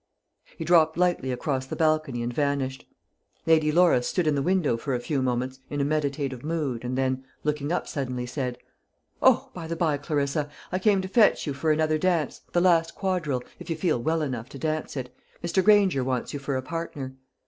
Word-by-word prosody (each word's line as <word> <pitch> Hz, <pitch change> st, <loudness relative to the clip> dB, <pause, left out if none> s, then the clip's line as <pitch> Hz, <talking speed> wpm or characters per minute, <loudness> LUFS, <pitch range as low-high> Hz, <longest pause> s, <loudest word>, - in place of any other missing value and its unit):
He 160 Hz, -, -4 dB
dropped 160 Hz, -1 st, +4 dB
lightly 175 Hz, -7 st, +1 dB
across 130 Hz, +1 st, -2 dB
the -, -, -4 dB
balcony 155 Hz, -6 st, +1 dB
and 120 Hz, +1 st, -3 dB
vanished. 140 Hz, -1 st, -1 dB, 0.6 s
Lady 155 Hz, -2 st, +4 dB
Laura 170 Hz, -6 st, +5 dB
stood 175 Hz, +7 st, -1 dB
in 155 Hz, -, +3 dB
the 140 Hz, -, 0 dB
window 175 Hz, -5 st, +2 dB
for 130 Hz, +3 st, -2 dB
a -, -, -1 dB
few 135 Hz, +2 st, -1 dB
moments 130 Hz, +1 st, -1 dB
in 145 Hz, -, -3 dB
a 140 Hz, -, +2 dB
meditative 140 Hz, -3 st, -1 dB
mood, 150 Hz, -7 st, -2 dB
and 125 Hz, +1 st, -2 dB
then, 130 Hz, 0 st, 0 dB, 0.2 s
looking 150 Hz, 0 st, -1 dB
up 180 Hz, -, -1 dB
suddenly, 125 Hz, -3 st, -3 dB
said, 125 Hz, -1 st, -3 dB, 0.6 s
"O, -, -, +4 dB
by 165 Hz, -2 st, -6 dB
the 165 Hz, -, -3 dB
bye, 160 Hz, -3 st, +1 dB
Clarissa, 145 Hz, 0 st, -1 dB, 0.2 s
I 185 Hz, -, 0 dB
came 200 Hz, -1 st, +3 dB
to -, -, -3 dB
fetch 210 Hz, +2 st, +4 dB
you 145 Hz, -, -2 dB
for 155 Hz, +3 st, 0 dB
another 155 Hz, 0 st, +2 dB
dance, 170 Hz, -5 st, 0 dB
the 175 Hz, -, +2 dB
last 165 Hz, -2 st, +3 dB
quadrille, 170 Hz, -10 st, -1 dB, 0.2 s
if -, -, -10 dB
you 165 Hz, -, 0 dB
feel 155 Hz, -7 st, 0 dB
well 160 Hz, +4 st, +1 dB
enough 125 Hz, -4 st, -4 dB
to 140 Hz, -, -9 dB
dance 155 Hz, 0 st, -2 dB
it. 125 Hz, -1 st, -5 dB, 0.3 s
Mr. 175 Hz, +2 st, +1 dB
Granger 200 Hz, -9 st, +5 dB
wants 130 Hz, -1 st, -2 dB
you 145 Hz, -, -3 dB
for 140 Hz, 0 st, -3 dB
a 130 Hz, -, -2 dB
partner." 145 Hz, -3 st, -5 dB
150 Hz, 205 wpm, -26 LUFS, 130-165 Hz, 0.6 s, Laura